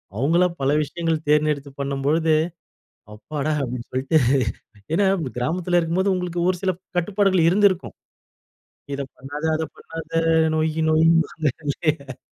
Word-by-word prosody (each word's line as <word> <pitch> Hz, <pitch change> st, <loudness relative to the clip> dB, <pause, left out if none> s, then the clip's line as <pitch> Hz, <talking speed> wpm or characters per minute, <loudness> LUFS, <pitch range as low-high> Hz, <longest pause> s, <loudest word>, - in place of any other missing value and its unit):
அவங்களா 165 Hz, -, +3 dB
பல 135 Hz, +1 st, +2 dB
விஷயங்கள் 165 Hz, +1 st, -2 dB
தேர்ந்தெடுத்து 150 Hz, -2 st, +1 dB
பண்ணும் 140 Hz, -1 st, -2 dB
பொழுது 160 Hz, +2 st, +3 dB, 0.8 s
"அப்பாடா!" 145 Hz, +8 st, -3 dB
அப்படின்னு 125 Hz, -2 st, -4 dB
சொல்லிட்டு. 130 Hz, +5 st, +1 dB, 0.8 s
ஏன்னா, 200 Hz, +4 st, +3 dB, 0.2 s
வ் 130 Hz, -, -4 dB
கிராமத்தில 175 Hz, +7 st, 0 dB
இருக்கும்போது 180 Hz, +4 st, +1 dB
உங்களுக்கு 180 Hz, -1 st, -3 dB
ஒரு 185 Hz, -, 0 dB
சில 190 Hz, -, +2 dB, 0.3 s
கட்டுப்பாடுகள் 190 Hz, -1 st, +2 dB
இருந்திருக்கும். 190 Hz, -1 st, +2 dB, 1.0 s
"இத 140 Hz, -, -3 dB
பண்ணாத, 145 Hz, +4 st, -7 dB
அத 160 Hz, -, -2 dB
பண்ணாத" 165 Hz, 0 st, -8 dB, 0.5 s
நொய் 155 Hz, 0 st, 0 dB, 0.2 s
நொய்ம்பாங்கல்ல. 155 Hz, -3 st, +1 dB
160 Hz, 115 wpm, -22 LUFS, 140-175 Hz, 1.0 s, அவங்களா